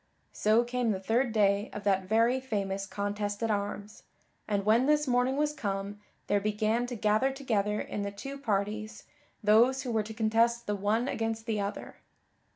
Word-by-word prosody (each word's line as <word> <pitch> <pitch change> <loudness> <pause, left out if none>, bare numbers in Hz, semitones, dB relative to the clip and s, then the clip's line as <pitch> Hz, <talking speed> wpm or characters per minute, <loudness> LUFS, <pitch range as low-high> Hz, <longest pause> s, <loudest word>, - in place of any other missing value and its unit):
So 220 +3 +3
came 245 -1 -1
the 195 -3 0
third 230 +6 +1
day 205 -1 +2
of 210 - -6
that 195 -2 +1
very 230 +5 +3
famous 200 -6 -3
contest 205 +1 -3
at 225 - +1
arms, 205 0 -4 0.5
and 200 -2 -1
when 230 +5 +4
this 300 -1 +3
morning 250 +2 +2
was 295 0 +1
come 200 -5 -4 0.3
there 205 0 +1
began 215 +3 0
to 245 - -5
gather 215 +4 +2
together 215 -7 -1
in 210 - -4
the 200 - -2
two 275 +8 -8
parties 215 -2 -2 0.4
those 240 +5 +4
who 250 - -3
were 220 -1 +1
to 215 +1 -7
contest 230 +2 +2
the 210 - -1
one 210 +5 0
against 225 -2 -2
the 220 -3 -1
other. 200 +1 -5
215 Hz, 175 wpm, -29 LUFS, 205-240 Hz, 0.5 s, when